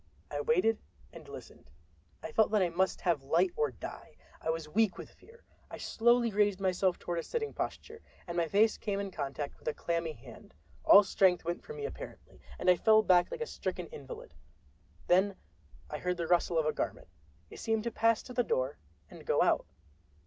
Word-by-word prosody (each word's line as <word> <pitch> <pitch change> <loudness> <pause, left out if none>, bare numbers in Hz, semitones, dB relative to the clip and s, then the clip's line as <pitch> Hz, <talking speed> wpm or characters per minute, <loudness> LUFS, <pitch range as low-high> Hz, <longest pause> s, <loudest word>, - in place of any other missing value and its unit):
I 145 0 -2
waited 185 +9 +2 0.3
and - - -12
listened. - - -12 0.5
I - - -5
felt 220 +6 +3
that 210 -1 +2
I 175 - +1
must 185 +3 0
have 170 -6 +1
light 170 +7 +2
or 150 - +1
die. 125 - -9 0.3
I - - -3
was 160 -1 -2
weak 210 +5 +1
with - - -9
fear. 470 +1 -20 0.3
I - - -7
slowly 235 0 +2
raised 205 -1 +2
myself 185 -1 +1
toward 175 -1 -3
a - - -4
sitting 445 -2 -3
posture, 450 0 -5 0.2
and 170 - -6
my 170 -1 +1
face 210 +5 +3
came 200 -2 -2
in 200 -1 -4
contact 140 -2 -5
with - - -16
a 155 - 0
clammy 165 -2 -2
hand! 120 - -14 0.3
All 205 - +9
strength 185 -3 +2
went 170 +1 -2
from 460 - -9
me 440 -1 -5
apparently, 450 - -9 0.2
and - - -5
I 180 -1 +6
fell 220 +3 +5
back 180 -3 +4
like 485 - -6
a - - 0
stricken - - -4
invalid. 485 0 -10 0.7
Then 190 +2 +3 0.5
I - - -5
heard 180 0 -1
the 170 - -2
rustle 175 0 +2
of 160 - +2
a 155 - +1
garment—it 80 +2 -7
seemed 225 -1 0
to 235 - -2
pass 225 0 +2
to 250 - -10
the 245 - +2
door 130 - -1 0.3
and - - -13
go - - +2
out. - - +2
185 Hz, 200 wpm, -31 LUFS, 160-220 Hz, 0.7 s, All